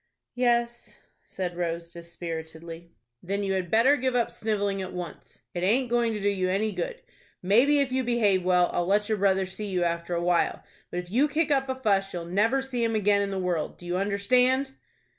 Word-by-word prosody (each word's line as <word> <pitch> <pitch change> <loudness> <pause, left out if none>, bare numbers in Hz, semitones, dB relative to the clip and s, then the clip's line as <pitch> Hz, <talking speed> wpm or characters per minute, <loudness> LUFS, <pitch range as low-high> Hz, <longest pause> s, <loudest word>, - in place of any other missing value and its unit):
"Yes," 240 -1 0 0.3
said 180 -2 -4
Rose, 170 -1 -3
dispiritedly. 170 -1 -8 0.3
"Then 200 +3 -2
you 195 -1 0
had 185 -2 -2
better 230 - +5
give 255 -1 -1
up 240 -1 +1
snivelling 205 -2 -1
at 185 - -6
once. 175 -3 -8
It 175 - -3
aint 235 +6 +1
going 235 -1 +2
to 210 - -3
do 200 - -1
you 190 -2 0
any 210 +3 0
good. - - -4 0.4
Maybe, 245 +10 +4
if 270 -2 -1
you 260 0 0
behave 215 -6 +2
well, 180 -1 +3
I'll 175 - 0
let 205 +2 +2
your 215 -2 0
brother 190 -1 +2
see 190 +3 -6
you 185 -3 0
after 170 0 -2
a 170 - -1
while, 175 -1 +1 0.3
but 175 - -3
if 175 0 -14
you 265 +7 +3
kick 305 +1 0
up 270 -1 +1
a 260 - -1
fuss 200 -6 0
you'll 175 -1 -4
never 215 +9 +1
see 250 -3 -2
him 225 -1 0
again 205 -1 +3
in 200 - -1
the 195 - -3
world. 180 -4 -2
Do 175 - -13
you 175 +1 -2
understand?" 250 +7 +2
200 Hz, 210 wpm, -27 LUFS, 180-240 Hz, 0.4 s, better